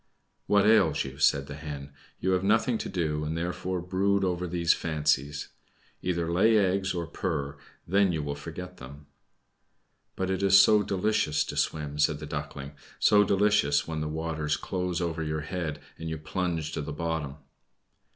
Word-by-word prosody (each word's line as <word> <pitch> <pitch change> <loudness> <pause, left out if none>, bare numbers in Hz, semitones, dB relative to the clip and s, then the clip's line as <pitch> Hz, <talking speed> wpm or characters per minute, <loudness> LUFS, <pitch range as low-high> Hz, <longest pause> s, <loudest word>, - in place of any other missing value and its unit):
"What 100 -1 +4
ails 100 -8 +4
you?" 65 +1 -8
said 70 -1 +3
the 70 - -8
Hen. 70 -2 -7 0.3
"You 95 - 0
have 90 0 +1
nothing 110 +3 +2
to - - -4
do, 75 -4 -1
and 80 +2 -3
therefore 90 +1 -3
brood 95 +2 +1
over 90 -1 -1
these 85 -1 +2
fancies. 75 -2 -1 0.5
Either 85 -2 -1
lay 110 +5 +4
eggs 95 -1 +1
or 85 -1 -2
purr, 70 -2 -3 0.3
then 100 +1 +3
you 80 -3 -2
will 70 0 -3
forget 85 +5 -8
them." 70 +3 -11 1.1
"But 95 0 -1
it 95 - -1
is 95 0 +7
so 105 -1 +6
delicious 100 -5 +1
to - - -6
swim!" 75 -1 -2
said 75 0 +3
the 75 - -7
Duckling. 75 -1 -6 0.3
"So 105 -1 +5
delicious 100 -8 +2
when 80 -1 -3
the 75 - -2
waters 80 -1 -2
close 90 -1 -2
over 85 -1 -2
your 75 0 -2
head, 80 -2 -4 0.2
and 80 0 -5
you 80 - -3
plunge 80 0 -2
to - - -3
the 75 - -5
bottom!" 80 -3 -3
80 Hz, 170 wpm, -28 LUFS, 75-95 Hz, 1.1 s, is